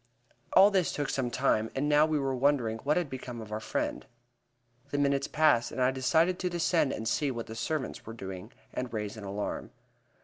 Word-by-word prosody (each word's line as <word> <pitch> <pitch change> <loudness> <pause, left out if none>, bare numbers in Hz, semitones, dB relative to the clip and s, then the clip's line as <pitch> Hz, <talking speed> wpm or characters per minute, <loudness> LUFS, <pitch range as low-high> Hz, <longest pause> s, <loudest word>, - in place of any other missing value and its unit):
All 200 +2 +8
this 190 -4 +2
took 145 -2 -2
some 130 -2 -1
time, 115 -4 +1
and 140 +2 0
now 150 +1 +5
we 155 -1 +1
were 135 -2 0
wondering 125 -4 +1
what 150 +7 +1
had 175 -3 0
become 130 -3 -7
of 110 -1 -9
our 110 - -2
friend. - - -2 0.9
The 145 - -2
minutes 140 -1 +1
passed, 150 -7 +3
and - - -6
I 130 0 +4
decided 160 +8 +2
to 180 - -1
descend 170 -4 +1
and 110 - -4
see 145 +5 +1
what 120 -3 -4
the 110 - -8
servants 130 +5 -3
were 115 - -8
doing, 95 -4 -7 0.2
and 125 -1 -3
raise 105 -1 -3
an 110 - -9
alarm. 100 +1 -4
130 Hz, 205 wpm, -30 LUFS, 115-150 Hz, 0.9 s, All